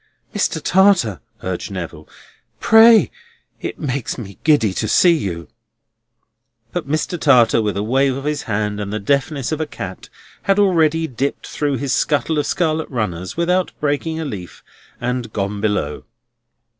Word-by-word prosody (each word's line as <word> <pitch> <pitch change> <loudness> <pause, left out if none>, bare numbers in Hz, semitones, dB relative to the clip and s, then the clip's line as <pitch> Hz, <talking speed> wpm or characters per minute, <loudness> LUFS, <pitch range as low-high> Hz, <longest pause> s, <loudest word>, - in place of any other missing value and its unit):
"Mr. 200 -5 0
Tartar!" 180 - +3 0.2
urged 90 -1 -3
Neville. 85 -5 -7 0.5
"Pray! 225 0 +6 0.5
It - - -5
makes 140 -4 -3
me 100 -6 -9
giddy 140 -11 +3
to 110 - -2
see 170 - +5
you!" 85 - -4 1.2
But 175 -6 -4
Mr. 155 +3 -1
Tartar, 120 -5 +5
with 105 -3 -1
a 100 - -1
wave 135 +3 +1
of 135 - -6
his 150 0 -1
hand 105 0 -1
and 100 -1 -4
the 105 - -2
deftness 140 +5 0
of 155 0 -2
a 155 - -2
cat, 95 -9 -8 0.3
had 195 0 +1
already 165 -5 +3
dipped 135 0 -3
through 145 -2 -2
his 135 0 -2
scuttle 150 +1 +1
of 145 - -1
scarlet 160 -2 0
runners 95 - -3
without 180 +2 +1
breaking 150 +2 -1
a 160 - -3
leaf, 95 - -8 0.4
and 125 -2 -3
"gone 100 0 -3
below." 100 -9 -1
135 Hz, 155 wpm, -19 LUFS, 105-160 Hz, 1.2 s, Pray